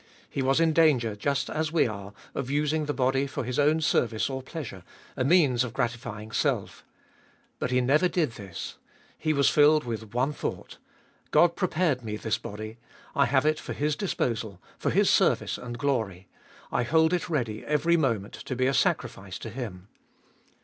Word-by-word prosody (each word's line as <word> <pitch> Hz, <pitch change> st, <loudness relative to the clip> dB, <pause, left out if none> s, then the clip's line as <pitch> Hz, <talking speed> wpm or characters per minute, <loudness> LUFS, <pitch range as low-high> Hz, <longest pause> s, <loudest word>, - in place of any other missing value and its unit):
He 140 Hz, -, -3 dB
was 135 Hz, +3 st, +2 dB
in 165 Hz, -1 st, +3 dB
danger, 135 Hz, -10 st, +3 dB
just 140 Hz, +6 st, -1 dB
as 155 Hz, 0 st, -2 dB
we 165 Hz, -, +3 dB
are, 100 Hz, -2 st, -7 dB, 0.2 s
of 135 Hz, -2 st, -3 dB
using 150 Hz, +2 st, +1 dB
the 145 Hz, -, -1 dB
body 135 Hz, +1 st, +1 dB
for -, -, -4 dB
His 125 Hz, +2 st, -2 dB
own 150 Hz, +2 st, +3 dB
service 120 Hz, -5 st, +1 dB
or 130 Hz, 0 st, -3 dB
pleasure, 130 Hz, -, -7 dB, 0.3 s
a 130 Hz, -, 0 dB
means 140 Hz, -5 st, +4 dB
of 120 Hz, -3 st, -5 dB
gratifying 115 Hz, -2 st, -3 dB
self. -, -, -1 dB, 0.8 s
But -, -, -1 dB
He 125 Hz, 0 st, +2 dB
never 150 Hz, +8 st, +3 dB
did 170 Hz, -7 st, 0 dB
this. 100 Hz, -6 st, -8 dB, 0.4 s
He 155 Hz, -, -1 dB
was 140 Hz, -2 st, +3 dB
filled 150 Hz, +1 st, +5 dB
with 110 Hz, -2 st, -6 dB
one 130 Hz, +4 st, +1 dB
thought -, -, -5 dB, 0.3 s
— -, -, -34 dB
God 170 Hz, 0 st, +4 dB
prepared 165 Hz, -8 st, 0 dB
Me 105 Hz, -1 st, -4 dB
this 110 Hz, 0 st, -1 dB
body; 110 Hz, +2 st, -7 dB, 0.4 s
I 140 Hz, -4 st, +4 dB
have 135 Hz, +3 st, +2 dB
it 155 Hz, 0 st, +2 dB
for -, -, -6 dB
His 150 Hz, +1 st, 0 dB
disposal, 115 Hz, -, -2 dB, 0.2 s
for -, -, 0 dB
His -, -, +3 dB
service -, -, +2 dB
and 120 Hz, -1 st, -6 dB
glory; 110 Hz, -9 st, -1 dB, 0.4 s
I -, -, +1 dB
hold 160 Hz, +7 st, +3 dB
it 180 Hz, 0 st, -1 dB
ready 115 Hz, -9 st, -2 dB
every 150 Hz, +3 st, +2 dB
moment 115 Hz, -10 st, 0 dB
to 135 Hz, -3 st, -3 dB
be 130 Hz, +1 st, +1 dB
a 135 Hz, -, +2 dB
sacrifice 100 Hz, -7 st, 0 dB
to 115 Hz, -, -7 dB
Him. 105 Hz, -6 st, -7 dB
130 Hz, 185 wpm, -27 LUFS, 115-150 Hz, 0.8 s, filled